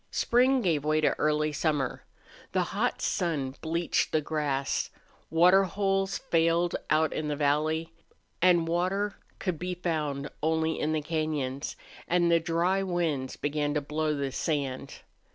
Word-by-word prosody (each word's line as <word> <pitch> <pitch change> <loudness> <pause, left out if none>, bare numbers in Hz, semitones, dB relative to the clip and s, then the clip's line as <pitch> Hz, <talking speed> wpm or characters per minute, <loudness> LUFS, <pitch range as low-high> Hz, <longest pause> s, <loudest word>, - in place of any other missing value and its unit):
Spring 255 +2 +3
gave 160 -5 +1
way 155 +1 +2
to 155 - +3
early 150 0 +2
summer. 145 -4 -1 0.5
The - - +2
hot - - 0
sun 145 -7 -1
bleached 165 +1 0
the 155 - +3
grass; 145 -3 -1 0.4
water 180 +4 +5
holes 195 +1 0
failed 165 +1 +1
out 155 +1 +3
in 155 - -2
the 150 - -1
valley, 155 +3 0 0.5
and 175 -2 +4
water 185 +4 0 0.2
could 180 -5 -3
be 180 0 -3
found 150 -5 -2
only 160 +1 +1
in 155 - 0
the 155 -1 -1
cañons; 150 -4 -2 0.3
and 175 0 +3
the 170 - +5
dry 170 +4 +1
winds 170 -8 -1
began 145 0 -1
to 150 - +1
blow 150 +1 -1
the 140 -1 -2
sand. 140 -2 -3
160 Hz, 145 wpm, -28 LUFS, 150-175 Hz, 0.5 s, water